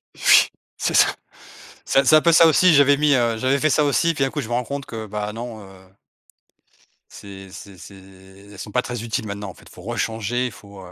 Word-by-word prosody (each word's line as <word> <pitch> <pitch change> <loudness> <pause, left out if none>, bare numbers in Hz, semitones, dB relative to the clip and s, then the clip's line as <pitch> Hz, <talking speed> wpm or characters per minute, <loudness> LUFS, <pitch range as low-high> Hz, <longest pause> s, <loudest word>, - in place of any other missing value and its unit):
Oui. - - +5 0.3
C'est - - -2
ça. - - +5 0.8
C'est 135 +1 +2
c'est 155 - +6
un 155 - +4
peu 170 - +3
ça 165 +1 +6
aussi. 165 +1 +4
J'avais 140 0 +5
mis, 150 0 +1
heu, 120 -2 +1
j'avais 130 +3 0
fait 155 +2 +1
ça 150 - +2
aussi 145 +4 +1
et - - -1
puis 135 - 0
un 135 - -2
coup, 150 - -4
je 115 - -7
me 120 - -3
rends 125 0 -1
compte 140 +1 -6
que, 110 -1 -7
bah, 105 0 -5
non, 115 -1 -8
heu 95 - -14 1.4
c'est 95 -1 -12
c'est 100 -1 -12
c'est 100 - -13
elles 95 +1 -17
sont 105 - -8
pas 125 - 0
très 120 -2 -6
utiles 110 -1 -4
maintenant, 100 0 -6
en - - -10
fait, - - -19
il - - -17
faut 90 - -14
rechanger, 115 +2 -3
il 125 - -4
faut, 100 0 -15
heu, 90 - -14
115 Hz, 245 wpm, -21 LUFS, 100-140 Hz, 1.4 s, c'est